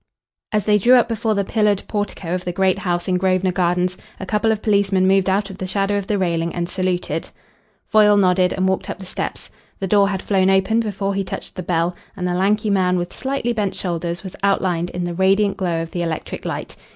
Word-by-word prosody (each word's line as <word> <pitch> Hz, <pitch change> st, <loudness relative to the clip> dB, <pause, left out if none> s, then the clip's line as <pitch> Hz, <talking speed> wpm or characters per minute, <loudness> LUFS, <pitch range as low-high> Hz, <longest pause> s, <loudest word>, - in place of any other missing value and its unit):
As 210 Hz, -2 st, 0 dB
they 210 Hz, -1 st, +4 dB
drew 245 Hz, +6 st, +6 dB
up 245 Hz, -1 st, +4 dB
before 225 Hz, -1 st, -1 dB
the 200 Hz, -, +1 dB
pillared 210 Hz, 0 st, +1 dB
portico 205 Hz, -4 st, -3 dB
of 180 Hz, 0 st, -2 dB
the 180 Hz, -, -2 dB
great 190 Hz, +1 st, +1 dB
house 175 Hz, -3 st, -1 dB
in 180 Hz, -1 st, +1 dB
Grosvenor 185 Hz, 0 st, +1 dB
Gardens 180 Hz, 0 st, 0 dB, 0.2 s
a 190 Hz, -, -5 dB
couple 210 Hz, +3 st, +1 dB
of 215 Hz, -1 st, -2 dB
policemen 200 Hz, -3 st, +2 dB
moved 195 Hz, 0 st, +3 dB
out 195 Hz, +1 st, 0 dB
of 190 Hz, -, -11 dB
the 185 Hz, -, -3 dB
shadow 195 Hz, +1 st, 0 dB
of 200 Hz, -1 st, -2 dB
the 210 Hz, -, 0 dB
railing 170 Hz, -3 st, -1 dB
and 170 Hz, -1 st, -2 dB
saluted. 185 Hz, -1 st, -2 dB, 0.6 s
Foyle 210 Hz, -1 st, +5 dB
nodded 185 Hz, -2 st, +3 dB
and 190 Hz, 0 st, 0 dB
walked 190 Hz, 0 st, -1 dB
up -, -, -4 dB
the 190 Hz, -, -10 dB
steps. 185 Hz, -, -5 dB, 0.3 s
The 195 Hz, -, -2 dB
door 200 Hz, +1 st, +3 dB
had 190 Hz, -2 st, -3 dB
flown 190 Hz, -2 st, +2 dB
open 195 Hz, +4 st, +3 dB
before 200 Hz, -3 st, -2 dB
he 195 Hz, 0 st, -1 dB
touched 185 Hz, -, -7 dB
the 185 Hz, -, -5 dB
bell, 170 Hz, 0 st, 0 dB, 0.2 s
and 180 Hz, -1 st, -2 dB
a 180 Hz, -, -1 dB
lanky 205 Hz, +3 st, +1 dB
man 185 Hz, -2 st, +2 dB
with 175 Hz, 0 st, -3 dB
slightly 265 Hz, -3 st, -2 dB
bent 210 Hz, -3 st, -1 dB
shoulders 170 Hz, -1 st, -3 dB
was 190 Hz, -1 st, -8 dB
outlined 185 Hz, -3 st, +1 dB
in 180 Hz, -, -4 dB
the 175 Hz, 0 st, -3 dB
radiant 195 Hz, +3 st, +2 dB
glow 170 Hz, -3 st, -1 dB
of 165 Hz, -, -9 dB
the 175 Hz, -, -3 dB
electric 165 Hz, -2 st, -4 dB
light. -, -, -4 dB
190 Hz, 225 wpm, -20 LUFS, 180-205 Hz, 0.6 s, drew